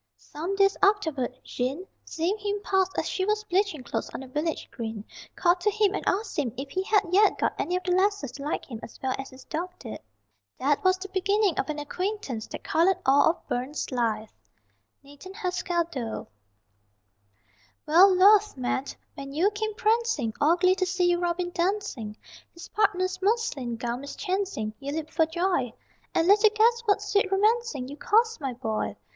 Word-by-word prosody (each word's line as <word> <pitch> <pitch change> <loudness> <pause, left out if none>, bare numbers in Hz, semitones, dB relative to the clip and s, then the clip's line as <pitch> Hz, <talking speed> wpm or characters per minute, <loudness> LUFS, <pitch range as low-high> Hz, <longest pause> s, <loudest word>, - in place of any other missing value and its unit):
Some 335 +6 -5
days 395 0 +4
afterward, 320 - +2
Jean, 270 +9 -3 0.2
seeing 335 +5 -1
him 410 0 -2
pass 380 -1 +2
as - - 0
she 375 - -1
was 425 +2 0
bleaching 380 -7 0
clothes 235 - -3
on - - -4
the 265 - -9
village 300 +5 -2
green, 220 -3 -6 0.3
called 350 0 +3
to 420 - +2
him 415 -1 +2
and - - -3
asked 395 -2 0
him 255 -6 0
if 270 +1 -6
he 375 - -1
had 410 +2 +3
yet 405 +2 +4
got - - 0
any 355 - 0
of 365 - -2
the 360 - -1
lasses 375 -7 +1
to 275 +2 -9
like 295 - -2
him 230 -4 -8
as - - -11
well 260 -1 +1
as 270 - -6
his 260 0 -14
dog 335 +4 -3
did. 230 - -8 0.6
That 280 +2 +1
was 370 0 +4
the 395 +1 -8
beginning 390 0 +1
of - - -1
an 305 - -2
acquaintance 295 - -4
that - - -8
coloured 340 +4 +3
all 275 +4 +5
of 330 - -4
Burns's 260 +6 -3
life._ 220 -3 -1 0.7
NATHAN 285 +7 -12
HASKELL 360 -3 -1
DOLE. 235 -7 -4 1.6
Well, 345 +6 +7
Luath, 410 0 +5
man, 260 +1 -1 0.3
when 275 0 -8
you 360 +8 +2
came 430 0 -3
prancing 445 - +1
All 310 +4 +5
glee 365 +1 +4
to 370 - +1
see 360 -1 +2
your 345 - +1
Robin 350 0 -1
dancing, 340 - -2 0.4
His 340 - -10
partner's 380 -4 0
muslin 385 - 0
gown 240 +1 -3
mischancing 365 - -3
You 280 0 -5
leaped 310 0 -5
for 320 -1 +3
joy! 340 -7 0 0.4
And 330 - +3
little 420 +2 +6
guessed 460 +2 +2
what 410 0 +3
sweet 405 -1 +1
romancing 425 - +1
You 285 +2 -9
caused, 455 -2 +2
my 270 -3 -2
boy! 225 -3 -3
355 Hz, 185 wpm, -27 LUFS, 275-405 Hz, 1.6 s, Well